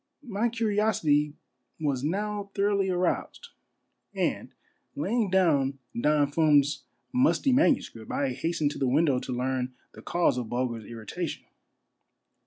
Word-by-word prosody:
My 225 +2 0
curiosity 205 -10 +1 0.4
was 140 -4 -1
now 205 +5 -2
thoroughly 200 -1 +1
aroused; 185 - -1 0.7
and - - -1 0.5
laying 240 -7 0
down 150 -8 +2 0.2
Don 145 +3 +2
Fum's 145 -2 +3 0.3
musty 265 +1 +3
manuscript, 255 - +1
I 140 - 0
hastened 150 +3 -1
to - - -7
the 135 - +1
window 140 0 +3
to 130 - -6
learn 125 0 -2 0.2
the - - -12
cause 170 -7 +1
of 120 -3 -5
Bulger's 120 -3 -2
irritation. 120 - -5
155 Hz, 120 wpm, -27 LUFS, 130-205 Hz, 0.7 s, Fum's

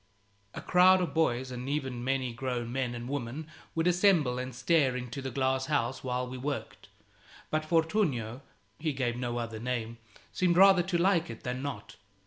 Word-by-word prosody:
A - - -5
crowd 185 +1 +5
of 180 - -2
boys 130 -5 +1
and 125 +1 -5
even 135 -4 -2
many 130 -2 -1
grown 120 -1 -3
men 125 -2 -2
and 120 0 -6
women 140 +2 -4 0.3
would 165 0 +1
assemble 175 -8 +3
and 130 +1 -4
stare 140 -3 +2
into 125 +1 -5
the 135 - -4
glass 130 +1 0
house 130 -4 -1
while 125 0 -2
we 130 0 -7
worked; 140 +2 -5 0.6
but 155 0 +1
Fortunio 155 - 0 0.4
(he 155 -1 -1
gave 125 -3 -1
no 120 -1 -3
other 115 -2 -4
name) 115 -1 -3 0.3
seemed 175 -2 +2
rather 190 -1 +7
to 175 0 -1
like 175 -3 +2
it 115 - -9
than 125 +1 -3
not. 140 -1 -6
130 Hz, 175 wpm, -30 LUFS, 125-160 Hz, 0.6 s, rather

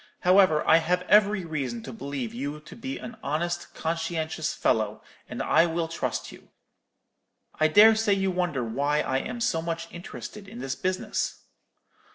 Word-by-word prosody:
'However, 180 -4 +4
I 160 - +7
have 180 +2 0
every 205 -2 +4
reason 135 -8 -3
to 130 - -8
believe 135 -1 -5
you 140 +5 -4
to 155 - -12
be 265 +3 -5
an 230 0 -9
honest, 175 +4 -3
conscientious 160 -1 -2
fellow, 110 -1 0 0.3
and - - -4
I 170 - +4
will 165 0 -1
trust 165 - -3
you. - - -15 1.1
I 155 - +5
dare 210 +7 +8
say 220 -2 +2
you 195 -1 +1
wonder 175 -8 -1
why 140 +6 0
I 130 0 0
am 240 - -5
so 165 -8 0
much 165 0 -4
interested 200 +3 -9
in - - -10
this 130 +1 -3
business?' 185 +5 -2
165 Hz, 165 wpm, -26 LUFS, 140-185 Hz, 1.1 s, dare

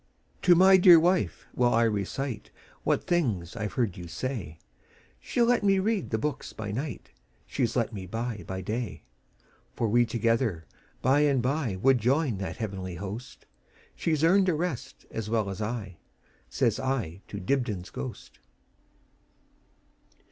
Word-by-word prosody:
"To 180 -1 +6
my 190 +2 +7
dear 180 -2 +9
wife 180 +3 +1
will 120 -1 +2
I 115 0 +4
reciteWhat 110 +3 -3
things 110 - 0
I 105 -2 -2
've - - -10
heard 110 -7 -1
you 85 -1 -7
say; 95 - -4 0.6
She - - -4
'll 235 - +6
let 240 -2 +2
me 195 -1 +4
read 205 +1 0
the 110 - 0
books 145 +4 -3
by 105 -2 -5
nightShe 130 +3 -5 0.6
's - - -7
let 120 -1 0
me 95 -3 -6
buy 115 +1 -4
by 95 0 -4
day. 105 -5 -4 0.7
For 115 - 0
we 120 +2 +3
together 115 -7 0 0.4
by 135 +3 +4
and 140 -4 +3
byWould 130 -3 +2
join 125 -1 +1
that 95 - -4
heavenly 95 -5 -4
host; 100 +7 -7 0.5
She 165 - 0
's 150 - -2
earned 190 +3 +5
a 170 - +2
rest 160 -4 -4
as 110 -1 -4
well 110 -3 0
as 95 - -6
I,"Says 110 +3 -4
I 120 -10 -2
to 100 - -6
Dibdin's 105 -4 -1
ghost. 65 - -8
115 Hz, 150 wpm, -28 LUFS, 100-145 Hz, 0.7 s, dear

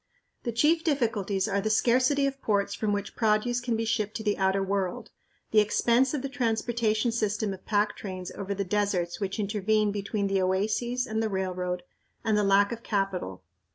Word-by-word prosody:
The 235 - -2
chief 305 +8 +3
difficulties 220 - 0
are 200 - 0
the 215 - -1
scarcity 255 +5 +3
of 275 0 -3
ports 200 -2 +1
from 205 +1 -1
which 205 0 -3
produce 225 +2 +1
can 240 -1 -1
be 225 0 -1
shipped 215 -2 -1
to 220 - -4
the 210 -1 +1
outer 190 0 +1
world, 200 +3 -2 0.4
the 215 - +6
expense 235 +6 +3
of 275 - -3
the - - -1
transportation 235 -3 0
system 215 -2 -1
of 190 - -12
pack 210 0 +1
trains 185 -3 -6
over 200 0 -4
the 200 - -1
deserts 185 -3 0
which 195 +1 -3
intervene 210 +1 +1
between 200 0 -2
the 195 -1 +1
oases 215 +7 0
and 220 -2 -2
the 220 - 0
railroad, 180 -2 -2 0.4
and 220 -1 +2
the 210 - +2
lack 200 +1 +4
of 235 -1 -5
capital. 195 - -2
210 Hz, 190 wpm, -28 LUFS, 195-235 Hz, 0.4 s, the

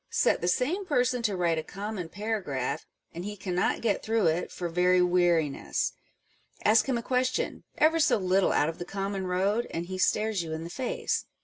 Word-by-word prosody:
Set - - +2
the 175 - -1
same 290 - +1
person 250 -7 +1
to 210 -4 0
write 170 -2 +1
a - - -4
common 200 -3 -5
paragraph, 180 - -3 0.3
and 170 - -6
he 205 +1 -5
cannot 180 -1 0
get 215 -4 +1
through 225 -2 +1
it 165 +2 +1
for 175 - -4
very 180 +2 +3
weariness: 175 -5 +1 0.7
ask 225 +5 +5
him 250 - +2
a 235 - -4
question, 255 0 -1
ever 320 +2 +4
so 295 - +4
little 190 0 +2
out 145 - +2
of 165 - -4
the - - -3
common 195 0 -3
road, 195 +6 +1
and 170 +1 -4
he 185 +1 -6
stares 215 0 +1
you 160 -2 -5
in 160 +1 -4
the 170 - -7
face. 255 +4 -2
190 Hz, 195 wpm, -28 LUFS, 175-225 Hz, 0.7 s, ask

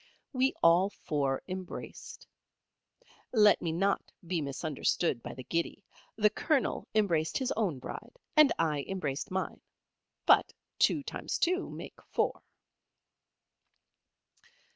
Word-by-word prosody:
We 260 +1 +2
all 175 +4 +6
four 140 -8 -2
embraced. 185 -1 -7 1.1
Let 210 -4 +5
me 165 - -1
not 195 +5 0
be 170 -1 -1
misunderstood 140 -1 -1
by - - -7
the 130 - -8
giddy. 170 +7 -2 0.3
The 210 -1 +4
Colonel 290 +4 0
embraced 170 -7 +2
his 260 -2 -1
own 195 -10 0
Bride, 130 - -8 0.2
and 305 -2 +7
I 150 -4 +1
embraced 150 -8 -3
mine. 190 0 -3 0.6
But - - +5 0.3
two 295 - +3
times - - -3
two 365 +2 +1
make - - -9
four. - - 0
185 Hz, 115 wpm, -31 LUFS, 155-215 Hz, 1.1 s, and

